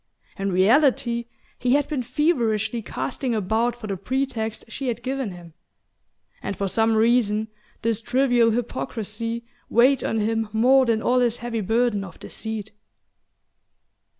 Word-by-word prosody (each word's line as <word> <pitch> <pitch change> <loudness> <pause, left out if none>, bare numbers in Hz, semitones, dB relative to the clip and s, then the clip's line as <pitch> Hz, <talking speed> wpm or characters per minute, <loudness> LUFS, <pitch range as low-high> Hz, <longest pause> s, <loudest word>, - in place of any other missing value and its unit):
In 195 -1 -2
reality 235 +4 +3 0.3
he 250 0 +2
had 290 -1 +1
been 295 -5 -2
feverishly 235 -5 0
casting 240 +3 -3
about 220 +4 0
for 240 - -9
the 200 -2 -2
pretext 235 -1 -2
she 265 +3 -5
had 240 - -2
given 265 -3 -2
him; 175 -3 -11 0.9
and 200 - -4
for 200 - -1
some 225 +3 +2
reason 220 -1 +2 0.3
this 225 -1 0
trivial 245 -2 +3
hypocrisy 230 -1 -3 0.2
weighed 255 +3 +4
on 225 - 0
him 225 0 0
more 255 +4 +4
than 225 -1 +1
all 250 +1 +3
his 240 -1 +1
heavy 235 -2 -3
burden 225 0 +1
of 175 -4 -10
deceit. 220 -1 -6
230 Hz, 140 wpm, -24 LUFS, 215-245 Hz, 0.9 s, weighed